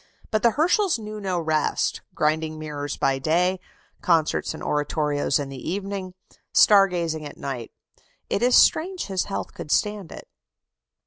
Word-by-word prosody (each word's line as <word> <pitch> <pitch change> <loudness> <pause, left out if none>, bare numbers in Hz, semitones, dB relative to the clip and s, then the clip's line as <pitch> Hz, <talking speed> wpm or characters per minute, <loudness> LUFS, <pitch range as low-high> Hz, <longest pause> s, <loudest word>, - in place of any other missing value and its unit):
But 215 - +1
the 235 - +5
Herschels 345 - +2
knew 215 -1 -7
no 185 -3 -1
rest. 155 -2 0
Grinding 155 +1 0
mirrors 145 -2 -5
by 135 0 +1
day, 180 +6 +1 0.4
concerts 165 -4 +1
and - - -9
oratorios 150 -1 0
in 140 -2 -4
the 135 +2 -6
evening, 195 0 -4 0.4
star 200 -2 +6
gazing 165 -4 -3
at 145 - -9
night. 130 -4 -5 0.6
It - - -1
is 245 +1 +4
strange 365 +3 +3
his 190 -2 -1
health 100 -1 -5
could - - -8
stand 205 0 0
it. - - -10
170 Hz, 150 wpm, -24 LUFS, 150-205 Hz, 0.6 s, star